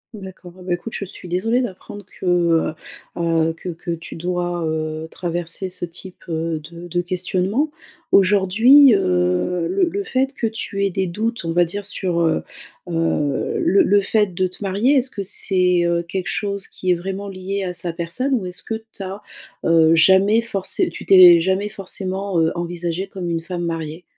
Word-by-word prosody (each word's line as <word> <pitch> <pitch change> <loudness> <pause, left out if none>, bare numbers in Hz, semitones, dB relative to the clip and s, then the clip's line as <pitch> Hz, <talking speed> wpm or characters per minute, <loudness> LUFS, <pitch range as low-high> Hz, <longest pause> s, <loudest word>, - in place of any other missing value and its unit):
D'accord, 190 -3 -10
bah, 180 -1 -1
écoute 175 +6 -5
je 200 - -4
suis 185 -1 -8
désolée 225 +8 +1
d'apprendre 205 -2 -7 0.2
que, - - -6
heu, 170 -3 +2 0.4
heu, 165 -1 +1
que 175 +2 -8
que 170 +1 -6
tu 170 0 -6
dois, 175 0 -2
heu, 155 0 -3
traverser 175 +1 -3
ce 180 - -5
type 180 +2 -10
de 165 -1 -2 0.3
de 175 +1 -1
questionnement. 185 - 0 0.4
Aujourd'hui, 210 +7 +6
heu, 90 - +1
le 395 - +1
le 400 +4 -3
fait 265 -5 -1
que 235 - -1
tu 210 -2 -4
aies 200 - +2
des 190 +1 -1
doutes 220 +4 -2
on 165 - -1
va 175 +1 +4
dire 200 +4 -4
sur, 180 -4 -1
heu, 160 -1 +2 0.5
heu, 165 -4 -1
le 195 - +4
le 205 +1 +4
fait 210 -1 +1
de 185 +1 0
te 180 +3 -9
marier, 205 +9 +2
est-ce 260 -1 +1
que 200 - -5
c'est, 180 -2 +1
heu, 170 0 +1
quelque 180 +2 -4
chose 200 -1 -2
qui 185 - -5
est 180 - +5
vraiment 195 +3 -5
liée 195 +1 -4
à 180 -1 -4
sa 175 -1 -3
personne 175 +12 -2
ou 215 -8 0
est-ce 180 - -7
que - - -4 0.2
tu 195 - -5
as, 195 +2 -6 0.4
heu, 165 -1 +5
jamais 190 +7 +5
forcé 195 -5 -1
tu - - -9
t'es 180 -3 +9
jamais 190 +4 0
forcément, 195 -1 -3
heu, 160 0 +2
envisagée 175 +1 -3
comme 185 -3 -5
une 165 -1 -1
femme 175 0 -5
mariée? 165 0 -4
180 Hz, 185 wpm, -20 LUFS, 170-200 Hz, 0.5 s, t'es